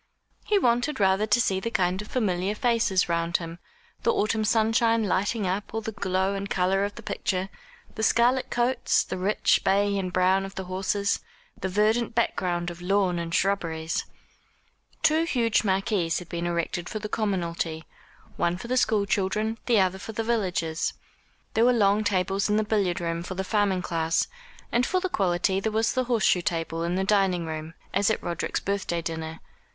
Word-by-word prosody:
He 420 - +3
wanted 245 - +1
rather 195 +2 +3
to 210 +2 +3
see 190 -5 +1
the 230 - -3
kind 190 0 -1
familiar 195 -4 0
faces 225 -5 +2
round 170 0 +1
him, 165 0 -8 0.4
the - - +3
autumn 220 +1 0
sunshine 225 +1 +3
lighting 205 +2 0
up 195 +4 -3
all 225 - -1
the 220 - -4
glow 190 -1 0
and 200 0 -4
colour 190 +2 +1
of 205 0 -3
the 235 - -10
picture, 190 -2 -2 0.4
the - - -5
scarlet 240 +3 +3
coats, 240 +2 +1
the - - -5
rich 200 +3 +2
bay 200 +1 +2
and 185 -1 -3
brown 185 +1 +3
of 195 0 -8
the 190 - -4
horses, 190 +2 -1 0.4
the 190 -3 -4
verdant 220 +4 +1
background 175 -6 0
of 170 0 -11
lawn 185 -1 +1
and 170 0 -3
shrubberies. 165 -5 0 1.0
Two 315 +1 +4
huge 235 -10 +1
marquees 195 -4 +1
had 180 - -7
been 170 0 -3
erected 170 0 -2
for - - -4
the 210 - -4
commonalty 170 -7 -2 0.5
one 170 +1 +1
for 210 - -8
the 255 +1 0
school 215 -4 +2
children, 215 +3 -1
the 235 -4 +4
other 190 0 +1
for 225 - -7
the 225 - -2
villagers. 180 -8 -1 0.6
There 225 - +3
were 250 - +5
long 210 -2 +3
tables 195 0 0
in 210 - +3
the 215 - +2
billiard 200 -5 0
room 170 -1 -2
for 185 +2 -6
the 190 - -2
farming 195 -2 +1
class; 165 -1 0 0.4
and 240 - +2
for 370 +9 +1
the 375 0 -2
quality 190 - +1
there 220 +2 -1
was 220 +1 +1
the 255 -1 0
horse 235 -4 +1
shoe 180 - +4
table 165 -1 -2
in 170 +1 -1
the 190 - 0
dining 190 -4 +2
room, 160 0 -6 0.2
as 200 +2 +2
at 220 - -1
Roderick's 170 -2 -2
birthday 195 -4 -2
dinner. 160 0 -5
195 Hz, 185 wpm, -26 LUFS, 180-220 Hz, 1.0 s, were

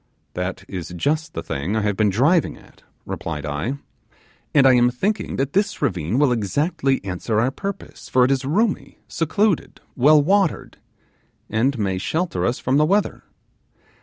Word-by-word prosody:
'That 95 +1 -4
is 90 -3 -6
just 155 - -1
the - - -4
thing 75 +10 -3
I 110 - +1
have 105 -1 0
been 105 +1 +2
driving 145 - +2
at,' - - -20 0.2
replied 75 -2 -5
I; 75 - -3 0.7
'and 140 -3 +4
I 130 - +7
am 120 0 +4
thinking 195 - -2
that 135 +1 -2
this 200 +1 0
ravine 90 +4 -1
will 145 -2 +3
exactly 135 - 0
answer 100 +4 -1
our 125 +4 +1
purpose, 200 +7 -7
for 125 -1 +4
it 130 - +1
is 135 -1 0
roomy, 200 - -1
secluded, 185 +3 0 0.2
well 150 +4 +6
watered, 190 +4 0 0.7
and 125 +5 +1
may 95 -3 -1
shelter 165 - -1
us 120 - -1
from 130 +2 0
the 150 - +4
weather. 200 +3 0
130 Hz, 165 wpm, -21 LUFS, 105-160 Hz, 0.7 s, I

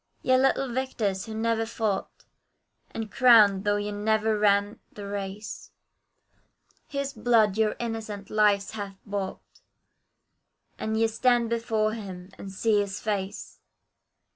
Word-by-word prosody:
Yea, 255 - +4
little 270 +1 +2
victors, 225 -6 -2
who 220 - -6
never 225 0 0
fought; 220 -3 -3 0.6
And 225 -2 -6
crowned, 215 -6 +6
though 205 0 +3
ye 205 0 -2
never 215 +1 +1
ran 205 +1 +2
the 205 - -9
race, 200 +1 -6 1.2
His 280 -1 -3
blood 220 -5 +3
your 220 -1 +1
innocent 220 -4 -5
lives 205 -2 +3
hath 200 -3 -6
bought, 200 -2 -4 1.4
And 220 0 -1
ye 225 - +4
stand 235 +1 +2
before 225 -2 0
Him 190 -4 -8
and 195 - -7
see 210 +2 +2
His 200 -1 -2
face! 200 -2 -4
215 Hz, 125 wpm, -27 LUFS, 200-225 Hz, 1.4 s, crowned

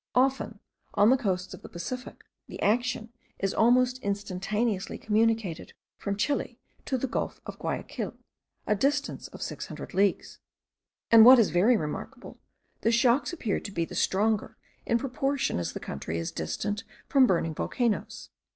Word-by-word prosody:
Often, 260 -4 +1 0.4
on 205 +4 +6
the - - +6
coasts 190 -7 -2
of - - -10
the - - -11
Pacific, 250 +9 -6 0.2
the - - -9
action 230 +1 0 0.2
is 195 -1 -1
almost 250 +2 +3
instantaneously 200 0 -2
communicated 220 -5 0 0.3
from 200 -1 -2
Chile 250 +1 -1 0.3
to 260 - 0
the 255 - -1
gulf 260 - -3
of - - -8
Guayaquil, - - -4 0.5
a 210 - +2
distance 275 +8 0
of - - -8
six - - -5
hundred - - -8
leagues; 195 0 +1 0.7
and, 225 -1 +10
what 255 +3 +10
is 225 -4 +4
very 215 +8 +4
remarkable, 150 -5 -6 0.4
the 230 - +2
shocks 240 +5 +3
appear 245 - -2
to 200 - -8
be 170 -3 -1
the - - -11
stronger 215 +2 +1 0.3
in 235 - +3
proportion 270 - -1
as 85 - -3
the - - -5
country 80 +4 -5
is 85 0 -3
distant 200 - -3 0.2
from 270 -2 +5
burning 165 -4 +1
volcanoes. 235 +7 -2
220 Hz, 155 wpm, -28 LUFS, 195-250 Hz, 0.7 s, and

